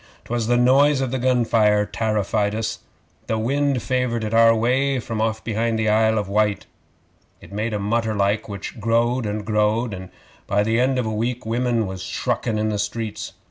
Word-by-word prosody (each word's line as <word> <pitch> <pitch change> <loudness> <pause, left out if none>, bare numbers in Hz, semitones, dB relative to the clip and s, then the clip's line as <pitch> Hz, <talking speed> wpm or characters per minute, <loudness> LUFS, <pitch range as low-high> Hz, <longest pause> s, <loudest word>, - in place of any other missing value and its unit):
'Twas 120 -1 -2
the 120 0 +3
noise 135 +3 +4
of 130 -2 -1
the 130 - -1
gun 125 -1 +2
fire 105 -2 +3
tarrified 105 -1 -1
us. 110 0 -3 0.5
The 110 - 0
wind 135 +2 0
favoured 125 -3 -1
it 110 +1 -3
our 115 0 +6
way 130 +4 +1
from 115 -2 -4
off 110 0 -1
behind 115 0 -1
the 110 -1 +1
Isle 110 +1 +3
of 105 -2 -1
Wight. 105 0 0 0.7
It - - -14
made 105 +3 -2
a 105 - -1
mutter 110 +2 -1
like, 100 +2 0
which 100 +3 -7
growed 115 +2 +1
and 105 0 -4
growed, 105 +1 +1
and 95 -1 -8 0.4
by 100 +1 +2
the 110 +2 +1
end 130 +1 +2
of 125 - 0
a 110 - -2
week 120 +3 -2
women 120 0 0
was 95 -1 -6
shruckin' 110 -2 -2
in 110 0 0
the 105 -1 -2
streets. 110 0 -4
110 Hz, 195 wpm, -22 LUFS, 105-120 Hz, 0.7 s, our